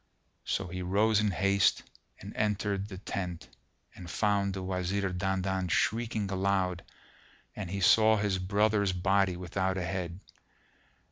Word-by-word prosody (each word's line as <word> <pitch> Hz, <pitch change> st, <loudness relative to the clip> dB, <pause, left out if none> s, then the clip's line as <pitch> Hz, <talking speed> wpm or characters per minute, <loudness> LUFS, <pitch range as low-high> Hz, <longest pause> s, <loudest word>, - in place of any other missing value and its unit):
So 95 Hz, -, -1 dB
he 90 Hz, +1 st, -5 dB
rose 105 Hz, +4 st, +2 dB
in 105 Hz, -1 st, +2 dB
haste 100 Hz, +1 st, +2 dB, 0.4 s
and -, -, -9 dB
entered 105 Hz, -1 st, -1 dB
the 95 Hz, -3 st, -8 dB
tent, 90 Hz, -3 st, -5 dB, 0.5 s
and 90 Hz, -, -10 dB
found 100 Hz, 0 st, +1 dB
the 95 Hz, -, -4 dB
Wazir 95 Hz, +1 st, -1 dB
Dandan 95 Hz, 0 st, -1 dB
shrieking 110 Hz, +1 st, 0 dB
aloud 95 Hz, -2 st, 0 dB, 0.7 s
and 95 Hz, -4 st, -5 dB
he 100 Hz, +2 st, -3 dB
saw 110 Hz, +3 st, +6 dB
his 100 Hz, -2 st, 0 dB
brother's 100 Hz, +1 st, +2 dB
body 95 Hz, 0 st, +2 dB
without 95 Hz, +1 st, -2 dB
a 90 Hz, -, -2 dB
head. 90 Hz, -1 st, -4 dB
95 Hz, 135 wpm, -30 LUFS, 90-100 Hz, 0.7 s, saw